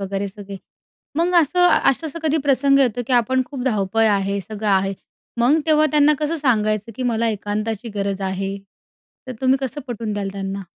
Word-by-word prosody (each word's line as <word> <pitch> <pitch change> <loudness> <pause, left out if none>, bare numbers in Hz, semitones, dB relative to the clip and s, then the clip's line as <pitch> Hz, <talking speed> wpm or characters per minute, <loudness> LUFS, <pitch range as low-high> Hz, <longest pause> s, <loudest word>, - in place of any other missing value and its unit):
वगैरे 195 0 -3
सगळे. 200 0 -9 0.6
मग 345 +3 +1
असं 355 +4 +3 0.2
असं-असं 320 +3 -4
कधी 315 0 +1
प्रसंग 275 0 +3
येतो, 245 -3 +2
की 260 - -3
आपण 255 +2 +2
खूप 275 -4 -7
धावपळ 220 -2 +1
आहे, 200 0 0
सगळं 210 +2 -5
आहे, 195 0 +2 0.5
मग 275 +7 +4
तेव्हा 310 -1 +4
त्यांना 300 0 +4
कसं 310 +2 -1
सांगायचं, 215 -5 0
की 255 - -4
"मला 230 -1 0
एकांताची 215 +2 -3
गरज 200 -1 -2
आहे", 195 +1 -3 0.7
तर 255 - -5
तुम्ही 260 +1 +3
कसं 270 +2 -4
पटवून 230 -3 -4
द्याल 200 -1 -3
त्यांना? 195 0 -5
225 Hz, 175 wpm, -20 LUFS, 200-275 Hz, 0.7 s, मग